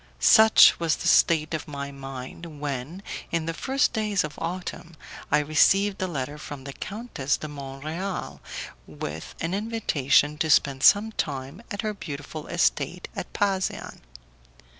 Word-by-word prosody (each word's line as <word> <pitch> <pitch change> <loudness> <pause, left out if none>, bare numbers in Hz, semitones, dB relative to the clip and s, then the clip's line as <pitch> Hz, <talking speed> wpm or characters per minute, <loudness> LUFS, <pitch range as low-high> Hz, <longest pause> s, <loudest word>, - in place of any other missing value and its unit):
Such 220 -1 +7
was 165 -2 +1
the - - -4
state 155 -1 +4
of 160 - -3
my 140 -1 -5
mind, 135 +3 -8
when, 145 +6 -4 0.3
in 165 -1 0
the 165 - -2
first 270 - +1
days 210 -3 +1
of 150 -1 -5
autumn, 170 -1 -5 0.4
I 150 - +5
received 190 +7 +3
a 185 - 0
letter 145 -2 -4
from 145 -2 -8
the 140 0 -7
Countess 195 - -3
de 155 - -6
Mont 135 -1 -8
Real 180 +5 -4 0.5
with 75 +1 -7
an 165 +2 -2
invitation 150 - +1
to 160 - 0
spend 140 -3 +3
some 210 +7 +6
time 140 0 -4
at 205 -2 -4
her 215 -1 -1
beautiful 150 -4 -7
estate - - 0
at - - -5
Pasean. 195 -3 -1
155 Hz, 150 wpm, -26 LUFS, 140-195 Hz, 0.5 s, Such